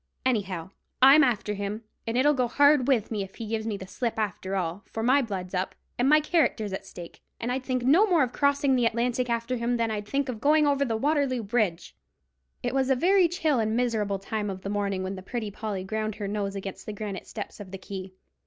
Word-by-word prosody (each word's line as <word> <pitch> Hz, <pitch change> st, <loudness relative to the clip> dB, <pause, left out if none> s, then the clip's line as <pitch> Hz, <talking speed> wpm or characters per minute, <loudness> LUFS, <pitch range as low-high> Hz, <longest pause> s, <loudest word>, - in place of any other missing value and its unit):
Anyhow, 195 Hz, -8 st, -1 dB, 0.3 s
I'm 275 Hz, +4 st, +8 dB
after 215 Hz, -5 st, +1 dB
him, 205 Hz, +2 st, -4 dB, 0.2 s
and 225 Hz, +1 st, -1 dB
it'll 290 Hz, +3 st, +4 dB
go 255 Hz, -3 st, +1 dB
hard 285 Hz, +1 st, +4 dB
with 240 Hz, -6 st, +2 dB
me 210 Hz, -2 st, -1 dB
if 195 Hz, 0 st, -7 dB
he 230 Hz, -, -6 dB
gives 220 Hz, 0 st, -3 dB
me 210 Hz, -3 st, -2 dB
the 190 Hz, -, -8 dB
slip 230 Hz, +5 st, -3 dB
after 195 Hz, -2 st, -2 dB
all, 180 Hz, 0 st, -2 dB
for 225 Hz, -, -4 dB
my 265 Hz, +4 st, +4 dB
blood's 190 Hz, -6 st, -5 dB
up, 185 Hz, 0 st, -2 dB, 0.2 s
and 255 Hz, +3 st, +3 dB
my 305 Hz, +1 st, +7 dB
character's 280 Hz, -, +1 dB
at 195 Hz, 0 st, -5 dB
stake, 175 Hz, -1 st, -10 dB, 0.2 s
and 235 Hz, +1 st, -2 dB
I'd 260 Hz, +1 st, -2 dB
think 255 Hz, -2 st, -1 dB
no 325 Hz, -, +5 dB
more 345 Hz, -7 st, +4 dB
of 250 Hz, -, -3 dB
crossing 280 Hz, -1 st, +2 dB
the 245 Hz, -2 st, +3 dB
Atlantic 245 Hz, +2 st, 0 dB
after 235 Hz, +2 st, -1 dB
him 240 Hz, +1 st, 0 dB
than 230 Hz, -1 st, 0 dB
I'd 210 Hz, -1 st, -4 dB
think 280 Hz, +2 st, 0 dB
of 230 Hz, -4 st, -5 dB
going 300 Hz, +2 st, +4 dB
over 280 Hz, -1 st, +2 dB
Waterloo 275 Hz, -2 st, +1 dB
Bridge!" 200 Hz, -5 st, -1 dB, 0.7 s
It -, -, -1 dB
was 265 Hz, -1 st, +1 dB
a 265 Hz, -, +4 dB
very 360 Hz, +6 st, +4 dB
chill 315 Hz, -6 st, 0 dB
and 220 Hz, 0 st, 0 dB
miserable 220 Hz, -5 st, 0 dB
time 205 Hz, +1 st, -3 dB
of 190 Hz, -1 st, -6 dB
the 195 Hz, -, -4 dB
morning 200 Hz, -2 st, -1 dB
when 190 Hz, +1 st, -3 dB
the 190 Hz, -, -7 dB
Pretty 215 Hz, +2 st, -4 dB
Polly 200 Hz, -2 st, -4 dB
ground 215 Hz, +1 st, -3 dB
her 205 Hz, -2 st, -4 dB
nose 200 Hz, -1 st, -2 dB
against 195 Hz, -1 st, -7 dB
the 215 Hz, -, -4 dB
granite 205 Hz, -2 st, -6 dB
steps 210 Hz, -1 st, -7 dB
of 200 Hz, -2 st, -9 dB
the 195 Hz, -, -6 dB
quay. 190 Hz, 0 st, -7 dB
225 Hz, 230 wpm, -27 LUFS, 200-260 Hz, 0.7 s, I'm